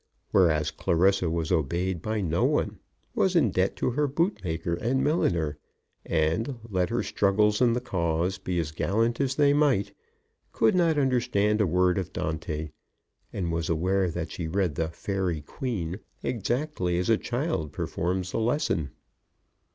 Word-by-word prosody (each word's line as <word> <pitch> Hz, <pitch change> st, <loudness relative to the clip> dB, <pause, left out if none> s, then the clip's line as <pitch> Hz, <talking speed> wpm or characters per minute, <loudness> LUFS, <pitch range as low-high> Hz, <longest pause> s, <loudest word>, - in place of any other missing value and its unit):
Whereas 80 Hz, -5 st, +3 dB
Clarissa 90 Hz, +2 st, +2 dB
was 80 Hz, -1 st, -2 dB
obeyed 85 Hz, +4 st, 0 dB
by 110 Hz, +2 st, -2 dB
no 85 Hz, -2 st, 0 dB
one, -, -, +1 dB, 0.3 s
was -, -, +1 dB
in -, -, +4 dB
debt -, -, +1 dB
to -, -, 0 dB
her 145 Hz, +4 st, +1 dB
bootmaker 100 Hz, -, -1 dB
and 125 Hz, +9 st, 0 dB
milliner, 85 Hz, -, +1 dB, 0.4 s
and, 85 Hz, -, 0 dB
let 90 Hz, -4 st, 0 dB
her -, -, 0 dB
struggles 105 Hz, +2 st, +2 dB
in 120 Hz, -2 st, +5 dB
the 125 Hz, -, -1 dB
cause 90 Hz, -4 st, -1 dB
be 90 Hz, -1 st, -3 dB
as 80 Hz, -3 st, -1 dB
gallant 115 Hz, -, 0 dB
as 135 Hz, -1 st, 0 dB
they 145 Hz, -1 st, +4 dB
might, 145 Hz, -9 st, +2 dB, 0.6 s
could 110 Hz, -, +3 dB
not 170 Hz, -4 st, +3 dB
understand 120 Hz, -6 st, +2 dB
a 105 Hz, -, +3 dB
word 90 Hz, +2 st, +2 dB
of 90 Hz, -, -5 dB
Dante, 80 Hz, -1 st, -3 dB, 0.6 s
and 90 Hz, -4 st, -2 dB
was 85 Hz, 0 st, -2 dB
aware 90 Hz, +3 st, +1 dB
that 85 Hz, -1 st, -4 dB
she 85 Hz, -, -4 dB
read 90 Hz, -1 st, 0 dB
the 80 Hz, +3 st, -1 dB
"Faery 90 Hz, -1 st, -2 dB
Queen" 95 Hz, -, -4 dB, 0.2 s
exactly 120 Hz, -, -1 dB
as 90 Hz, -, 0 dB
a -, -, +6 dB
child 120 Hz, -, -2 dB
performs 90 Hz, +2 st, -2 dB
a -, -, 0 dB
lesson. 115 Hz, -, 0 dB
95 Hz, 155 wpm, -27 LUFS, 85-120 Hz, 0.6 s, a